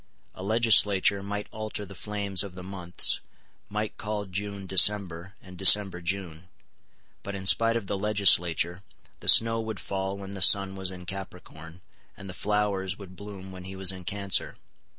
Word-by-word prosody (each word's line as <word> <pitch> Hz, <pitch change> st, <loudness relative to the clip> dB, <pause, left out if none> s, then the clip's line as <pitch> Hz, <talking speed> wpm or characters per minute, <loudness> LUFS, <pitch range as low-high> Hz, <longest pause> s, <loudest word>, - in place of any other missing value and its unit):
A -, -, -11 dB
legislature 105 Hz, -2 st, +3 dB
might 105 Hz, +1 st, -5 dB
alter 110 Hz, -1 st, -6 dB
the 95 Hz, -, -12 dB
flames 100 Hz, 0 st, -3 dB
of 100 Hz, -3 st, -7 dB
the 90 Hz, -, -9 dB
months, 90 Hz, -2 st, 0 dB, 0.5 s
might 105 Hz, +1 st, -4 dB
call 105 Hz, 0 st, -4 dB
June 100 Hz, +1 st, -6 dB
December, 95 Hz, -1 st, +3 dB
and 95 Hz, -1 st, -13 dB
December 95 Hz, -1 st, +6 dB
June; 90 Hz, -1 st, -5 dB, 0.7 s
but, 100 Hz, -, -7 dB
in 95 Hz, -1 st, -7 dB
spite 115 Hz, +5 st, +4 dB
of 115 Hz, -3 st, -3 dB
the 100 Hz, 0 st, -4 dB
legislature, 90 Hz, -4 st, +2 dB, 0.4 s
the -, -, -1 dB
snow 115 Hz, 0 st, +6 dB
would 110 Hz, -2 st, -6 dB
fall 95 Hz, 0 st, -4 dB
when 100 Hz, 0 st, -9 dB
the 100 Hz, -1 st, -7 dB
sun 95 Hz, +2 st, +4 dB
was 95 Hz, -1 st, -4 dB
in 90 Hz, -1 st, -10 dB
Capricorn, 90 Hz, -3 st, -10 dB, 0.4 s
and 100 Hz, -, -11 dB
the 95 Hz, -, -7 dB
flowers 100 Hz, -2 st, -2 dB
would 95 Hz, -3 st, -12 dB
bloom 100 Hz, -1 st, -10 dB
when 90 Hz, -1 st, -11 dB
he 95 Hz, +1 st, -8 dB
was 95 Hz, -1 st, 0 dB
in 95 Hz, -1 st, -10 dB
Cancer. 100 Hz, 0 st, -1 dB
95 Hz, 170 wpm, -26 LUFS, 95-105 Hz, 0.7 s, December